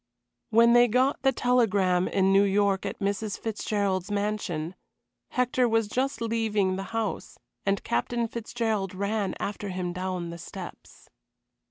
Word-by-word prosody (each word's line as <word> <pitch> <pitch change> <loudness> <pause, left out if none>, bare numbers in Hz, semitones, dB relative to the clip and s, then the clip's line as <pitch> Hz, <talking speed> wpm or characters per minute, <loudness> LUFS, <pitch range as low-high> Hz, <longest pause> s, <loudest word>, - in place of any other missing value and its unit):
When 235 +1 +6
they 240 0 +7
got 255 +5 +2
the 270 - +4
telegram 200 -9 +2
in 195 0 +2
New 195 - +6
York 200 -1 +2
at - - -5
Mrs. 200 +1 -2
Fitzgerald's 200 -4 -1
mansion, 200 -6 -2 0.6
Hector 250 0 +1
was 225 -1 +2
just 255 +2 -1
leaving 220 -4 +1
the 195 +1 -4
house, 225 -2 -3 0.3
and 195 0 +1
Captain 235 - -1
Fitzgerald 220 -4 -2
ran 200 0 -1
after 205 0 -4
him 180 -1 -3
down 180 -2 -3
the 170 - -8
steps. - - -10
205 Hz, 140 wpm, -27 LUFS, 190-230 Hz, 0.6 s, they